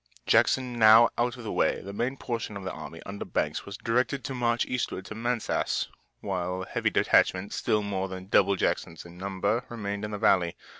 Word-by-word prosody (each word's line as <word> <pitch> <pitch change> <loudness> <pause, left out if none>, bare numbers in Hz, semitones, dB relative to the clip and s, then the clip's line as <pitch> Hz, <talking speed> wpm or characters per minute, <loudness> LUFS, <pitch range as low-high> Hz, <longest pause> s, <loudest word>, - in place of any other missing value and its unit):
Jackson 125 -2 +2
now 110 +1 +8
out 120 +1 0
of 120 - -9
the 110 - -4
way, - - +1
the 100 +1 -8
main 125 +6 -2
portion 115 -5 -4
of 100 - -8
the 95 - -3
army 80 - -9
under 100 +1 -5
Banks 75 - -2
was 100 +1 -7
directed 125 +4 0
to 135 - -4
march 120 -2 +1
eastward 125 -6 -3
to - - -7
Manassas, 120 +1 -1 0.3
while 90 -1 -2
a - - -9
heavy - - 0
detachment 95 +2 +2
still 105 -1 0
more 95 -2 -2
than 95 -1 -7
double 100 0 +3
Jackson's 85 -2 -2
in 85 +1 -13
numbers 100 +4 -1
remained 100 -3 -4
in 105 - -3
the 105 - -4
valley. 90 -4 +3
100 Hz, 200 wpm, -28 LUFS, 95-120 Hz, 0.3 s, now